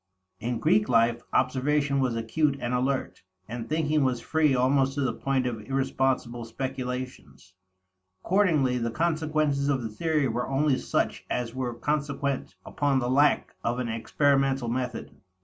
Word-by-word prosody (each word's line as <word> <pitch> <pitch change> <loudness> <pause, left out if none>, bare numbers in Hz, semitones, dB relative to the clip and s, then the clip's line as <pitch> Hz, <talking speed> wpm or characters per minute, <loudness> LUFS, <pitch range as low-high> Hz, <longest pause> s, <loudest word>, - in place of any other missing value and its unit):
In 120 +2 -2
Greek 110 0 +2
life, 115 0 +3
observation 140 +2 +1
was 130 -3 +1
acute 140 +6 0
and 120 +1 -2
alert; 130 +2 -1 0.3
and 115 +1 -6
thinking 155 -1 +1
was 130 -2 +1
free 155 +1 +2
almost 135 +1 +2
to 145 - -1
the 130 - 0
point 135 -2 -1
of 115 -3 -3
irresponsible 130 -1 -1
speculations. 125 - -6 0.7
Accordingly 155 -10 +2
the 115 0 -1
consequences 155 -1 0
of 135 -3 0
the 110 - -3
theory 155 +4 0
were 120 +2 -2
only 135 0 +2
such - - -1
as 120 -2 -2
were 125 -2 -3
consequent 140 0 -2
upon 145 -2 0
the 125 -1 0
lack 145 +3 +3
of 120 +1 0
an 125 -2 -2
experimental 135 +2 +1
method. 125 +1 -3
130 Hz, 150 wpm, -27 LUFS, 120-145 Hz, 0.7 s, life